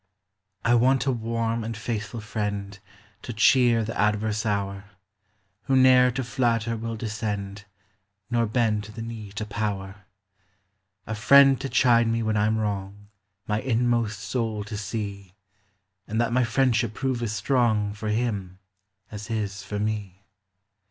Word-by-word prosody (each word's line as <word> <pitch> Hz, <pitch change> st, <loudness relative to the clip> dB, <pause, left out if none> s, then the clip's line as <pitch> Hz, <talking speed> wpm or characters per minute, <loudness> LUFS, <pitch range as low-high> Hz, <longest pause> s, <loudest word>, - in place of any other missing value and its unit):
I 115 Hz, -, +4 dB
want 130 Hz, +3 st, +3 dB
a 135 Hz, -, +2 dB
warm 115 Hz, -1 st, -2 dB
and 115 Hz, 0 st, -5 dB
faithful 110 Hz, -1 st, -4 dB
friend, 100 Hz, -1 st, -4 dB, 0.4 s
To -, -, -6 dB
cheer 120 Hz, 0 st, +4 dB
the 115 Hz, -, -5 dB
adverse 105 Hz, +1 st, 0 dB
hour; 100 Hz, -1 st, -2 dB, 0.8 s
Who 135 Hz, -, +2 dB
ne'er 130 Hz, -1 st, +6 dB
to 130 Hz, -, -2 dB
flatter 115 Hz, -2 st, 0 dB
will 115 Hz, 0 st, -4 dB
descend, 105 Hz, -3 st, -4 dB, 0.7 s
Xor 115 Hz, -2 st, +1 dB
bend 110 Hz, -3 st, +1 dB
the 110 Hz, +2 st, -8 dB
knee 110 Hz, -3 st, -7 dB
to 105 Hz, +1 st, -4 dB
power, 100 Hz, -2 st, -4 dB, 0.5 s
— 95 Hz, 0 st, -49 dB
A 110 Hz, -, -4 dB
friend 135 Hz, +5 st, +6 dB
to 135 Hz, -, -3 dB
chide 120 Hz, -3 st, +4 dB
me 115 Hz, 0 st, 0 dB
when 110 Hz, 0 st, 0 dB
I 105 Hz, 0 st, +2 dB
'm 110 Hz, 0 st, +1 dB
wrong, 100 Hz, -1 st, -4 dB, 0.4 s
My 105 Hz, 0 st, 0 dB
inmost 115 Hz, -4 st, 0 dB
soul 110 Hz, -2 st, -2 dB
to 105 Hz, +1 st, -7 dB
see; 100 Hz, -2 st, -5 dB, 0.7 s
And 110 Hz, +2 st, -2 dB
that 120 Hz, 0 st, +1 dB
my 125 Hz, 0 st, +3 dB
friendship 115 Hz, -2 st, +1 dB
prove 130 Hz, -2 st, -1 dB
as 110 Hz, -3 st, -2 dB
strong 110 Hz, -4 st, +1 dB
For 105 Hz, +1 st, -5 dB
him 105 Hz, -5 st, -2 dB, 0.5 s
as 105 Hz, 0 st, -7 dB
his 105 Hz, -3 st, -3 dB
for 100 Hz, +2 st, -5 dB
me. 105 Hz, -2 st, -3 dB
110 Hz, 150 wpm, -25 LUFS, 105-115 Hz, 0.8 s, ne'er